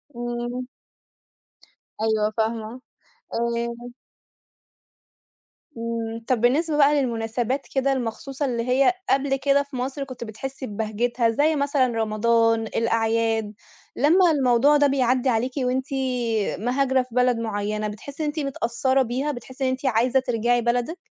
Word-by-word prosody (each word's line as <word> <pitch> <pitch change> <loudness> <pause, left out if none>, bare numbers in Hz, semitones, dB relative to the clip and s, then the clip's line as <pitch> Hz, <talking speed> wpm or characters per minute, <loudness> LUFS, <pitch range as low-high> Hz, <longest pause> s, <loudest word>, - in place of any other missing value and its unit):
إمم. 240 +1 -4 1.4
أيوه 220 -1 +1
فاهمة. 225 +2 -2 0.5
آآ 235 0 -1 2.1
إمم، 230 0 -4
طَب 250 -4 +1
بالنسبة 295 +6 +2
بقى 290 0 +5
للمناسبات 240 +2 -2
كده 270 0 +2
المخصوصة 265 +3 -3
اللي 235 -2 -2
هي 270 +7 +4 0.2
قبل 270 0 +2
كده 280 +1 +2
في 280 -1 -12
مصر 265 +3 -3
كنت 255 -3 -8
بتحسّي 260 +5 -6
ببهجتها، 225 +3 0
زي 300 +7 +2
مثلًا 280 -2 +2
رمضان، 225 0 +1
الأعياد، 225 -1 0 0.4
لمّا 335 +5 +4
الموضوع 270 +1 +4
ده 290 0 +4
بيعدّي 255 -1 +2
عليكِ 240 +2 0
وأنتِ 260 +1 0 0.7
مهاجرة 260 +3 +1
في 250 -2 -14
بلد 250 -1 +3
مُعيّنة، 210 -1 -2
بتحسّي 275 +9 -7
إن - - 0
أنتِ 305 +1 -3
متأثرة 265 -1 0
بيها، 260 +5 -2
بتحسّي 260 +2 -6
إن 260 - +2
أنتِ 260 +1 -3
عايزة 250 +2 +3
ترجعي 240 -1 +1
بلدِك؟ 245 +8 -1
245 Hz, 130 wpm, -24 LUFS, 230-270 Hz, 2.1 s, بقى